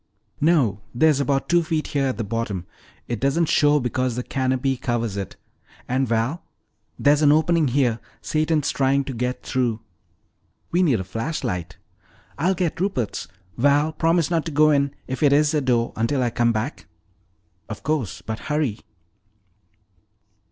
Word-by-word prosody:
"No, 145 - +2
there's 150 +2 +4
about 140 0 0
two 175 0 +4
feet 160 -2 -2
here 140 -2 0
at 130 - -2
the 115 - -2
bottom. 105 -4 -3 0.4
It 120 -3 -3
doesn't 140 +5 +2
show 150 0 +4
because 125 -1 -1
the 125 - -3
canopy 130 0 0
covers 120 -4 -2
it. 100 -2 -5 0.5
And, 130 +1 0
Val, 115 +9 0 0.6
there's 145 +1 +3
an 145 -1 +6
opening 160 0 +3
here! 125 -3 +1 0.2
Satan's 155 -1 0
trying 140 +1 +2
to 135 - -5
get 125 +2 -3
through!" 120 -4 -1 0.9
"We 175 - +2
need 140 - +3
a - - -3
flashlight." 90 - -4 0.6
"I'll 185 +5 +2
get 170 -1 -2
Rupert's. 130 - -2 0.3
Val, 145 +4 +3
promise 165 +1 +1
not 165 -2 +1
to 165 - -4
go 155 +1 +4
in 140 -1 +1
if 130 -1 -5
it 145 -2 +5
is 150 +2 +3
a 150 - +2
door 120 -3 +1
until 125 +4 0
I 120 - 0
come 120 0 +2
back!" 115 +6 -4 0.8
"Of - - -7
course; 150 -9 -2
but 110 0 -4
hurry." 150 -8 -1
135 Hz, 160 wpm, -23 LUFS, 120-155 Hz, 0.9 s, an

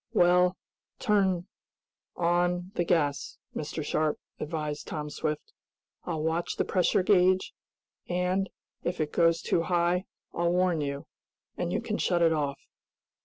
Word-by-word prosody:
"Well, 180 -2 +4 0.4
turn 190 -6 +2 0.7
on 175 +1 +1
the 175 - +1
gas, 150 -5 0 0.2
Mr. 155 0 -4
Sharp," 155 0 0 0.2
advised 150 -1 -3
Tom 150 -1 -4
Swift. 155 - -3 0.5
"I'll 160 -3 -2
watch 165 +2 -1
the - - 0
pressure 185 0 +2
gauge, 185 -1 +3 0.6
and, 180 +2 0 0.3
if 175 +1 -2
it 155 -1 -1
goes 165 -1 +3
too 170 - +2
high, 175 +1 +1 0.3
I'll 170 0 +1
warn 180 -3 +2
you, 140 -1 -3 0.5
and - - -2
you - - 0
can - - -3
shut 175 -1 +2
it 165 -1 +5
off." 145 -3 -1
175 Hz, 135 wpm, -29 LUFS, 155-180 Hz, 0.7 s, it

